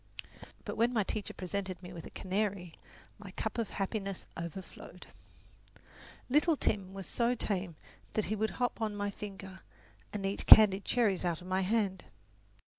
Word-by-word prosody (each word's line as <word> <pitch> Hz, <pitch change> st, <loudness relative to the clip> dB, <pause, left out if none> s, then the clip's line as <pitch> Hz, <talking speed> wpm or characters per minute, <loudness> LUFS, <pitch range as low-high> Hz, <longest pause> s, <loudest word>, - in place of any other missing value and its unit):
But -, -, -4 dB
when 235 Hz, +2 st, +3 dB
my 220 Hz, -3 st, +2 dB
teacher 205 Hz, +1 st, -3 dB
presented 185 Hz, -1 st, -4 dB
me 180 Hz, 0 st, -8 dB
with 165 Hz, -2 st, -8 dB
a -, -, -10 dB
canary, 190 Hz, -3 st, -2 dB, 0.5 s
my 205 Hz, -2 st, -9 dB
cup 220 Hz, +5 st, -3 dB
of 225 Hz, -, -1 dB
happiness 195 Hz, -1 st, -3 dB
overflowed. 170 Hz, +3 st, -8 dB, 1.2 s
Little 305 Hz, +5 st, +4 dB
Tim 195 Hz, -6 st, 0 dB
was 195 Hz, -1 st, -6 dB
so 240 Hz, +5 st, +1 dB
tame 190 Hz, -6 st, -2 dB, 0.4 s
that 215 Hz, -, 0 dB
he 215 Hz, -, -1 dB
would 220 Hz, +1 st, 0 dB
hop 245 Hz, -2 st, -1 dB
on 215 Hz, -2 st, -1 dB
my 205 Hz, 0 st, -2 dB
finger 195 Hz, -2 st, -8 dB, 0.5 s
and 200 Hz, -2 st, -3 dB
eat 195 Hz, +1 st, -2 dB
candied 200 Hz, -2 st, +9 dB
cherries 215 Hz, -7 st, +2 dB
out 170 Hz, -3 st, 0 dB
of 180 Hz, -, -12 dB
my 185 Hz, +1 st, 0 dB
hand. 195 Hz, -1 st, 0 dB
200 Hz, 160 wpm, -32 LUFS, 185-215 Hz, 1.2 s, candied